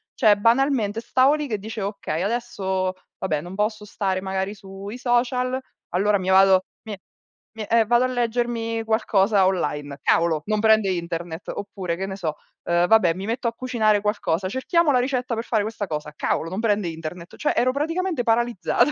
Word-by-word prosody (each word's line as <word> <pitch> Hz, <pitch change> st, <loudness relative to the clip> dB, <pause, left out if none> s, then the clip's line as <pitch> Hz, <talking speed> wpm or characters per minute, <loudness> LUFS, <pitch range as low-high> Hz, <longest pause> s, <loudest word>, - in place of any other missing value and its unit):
cioè, 215 Hz, -5 st, +5 dB
banalmente 230 Hz, -1 st, +2 dB
stavo 260 Hz, +5 st, +3 dB
lì 300 Hz, -1 st, -3 dB
che 215 Hz, -5 st, -2 dB
dicevo: 215 Hz, -1 st, -4 dB
"Okay, 170 Hz, -5 st, -4 dB
adesso, 195 Hz, -5 st, -1 dB, 0.3 s
vabbè, 155 Hz, -6 st, -1 dB
non 175 Hz, +3 st, -8 dB
posso 210 Hz, 0 st, -1 dB
stare 190 Hz, -2 st, -2 dB
magari 190 Hz, +1 st, -2 dB
sui 195 Hz, +3 st, -9 dB
social, 250 Hz, +1 st, +1 dB, 0.4 s
allora 200 Hz, +3 st, +3 dB
mi 185 Hz, -, -5 dB
vado 190 Hz, 0 st, +5 dB, 0.2 s
mi 215 Hz, -3 st, -6 dB, 0.6 s
mi 220 Hz, -, -3 dB
eh, 225 Hz, +1 st, +3 dB
vado 240 Hz, +3 st, +3 dB
a -, -, +1 dB
leggermi 235 Hz, -2 st, -1 dB
qualcosa 205 Hz, -3 st, +3 dB
online. 145 Hz, -6 st, -1 dB
Cavolo! 165 Hz, -2 st, +2 dB
Non 215 Hz, 0 st, 0 dB
prende 220 Hz, -2 st, +4 dB
internet." 170 Hz, -1 st, -4 dB
Oppure, 190 Hz, -4 st, -4 dB
che 190 Hz, -, -3 dB
ne 190 Hz, -, -5 dB
so, 160 Hz, -5 st, -3 dB, 0.3 s
uhm: 175 Hz, +1 st, +2 dB
"Vabbè, 205 Hz, -7 st, +5 dB
mi 190 Hz, +2 st, -5 dB
metto 235 Hz, +3 st, -2 dB
a -, -, -10 dB
cucinare 225 Hz, -4 st, +1 dB
qualcosa, 195 Hz, -3 st, -1 dB
cerchiamo 305 Hz, -, +2 dB
la 250 Hz, -, +3 dB
ricetta 250 Hz, -2 st, -1 dB
per 225 Hz, -, -3 dB
fare 220 Hz, -3 st, +1 dB
questa 210 Hz, -2 st, -4 dB
cosa. 150 Hz, -1 st, -4 dB
Cavolo! 160 Hz, -, -1 dB
Non 185 Hz, +4 st, -4 dB
prende 210 Hz, -4 st, +1 dB
internet." 165 Hz, +2 st, -8 dB
Cioè, 300 Hz, -, 0 dB
ero 255 Hz, +1 st, +3 dB
praticamente 325 Hz, +1 st, -1 dB
paralizzata. 235 Hz, +4 st, +2 dB
210 Hz, 180 wpm, -23 LUFS, 185-240 Hz, 0.6 s, cioè